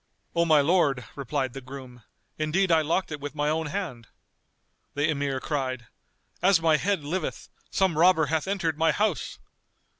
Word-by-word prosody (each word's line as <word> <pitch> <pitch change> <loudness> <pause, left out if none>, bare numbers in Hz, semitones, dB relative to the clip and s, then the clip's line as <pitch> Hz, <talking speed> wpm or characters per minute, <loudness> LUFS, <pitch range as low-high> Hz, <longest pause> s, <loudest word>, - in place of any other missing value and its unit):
"O 170 0 +3
my 155 -3 +5
lord," 140 -6 +2
replied 135 -2 -2
the 135 - -7
groom, 130 -1 -10 0.4
"indeed 170 +5 +1
I 160 -1 +5
locked 165 +4 -1
it 150 - -4
with 145 +1 -6
my 150 0 0
own 160 0 -1
hand." 150 - -5 0.9
The 145 +2 +1
Emir 140 -3 -1
cried, 130 -4 -3 0.6
"As 185 -1 +5
my 160 -2 +3
head 195 -1 0
liveth, 175 +6 -4 0.2
some 190 -4 +1
robber 170 -2 +5
hath 155 +4 -1
entered 170 -6 -1
my 165 0 +4
house!" 210 -5 -1
155 Hz, 160 wpm, -26 LUFS, 140-170 Hz, 0.9 s, my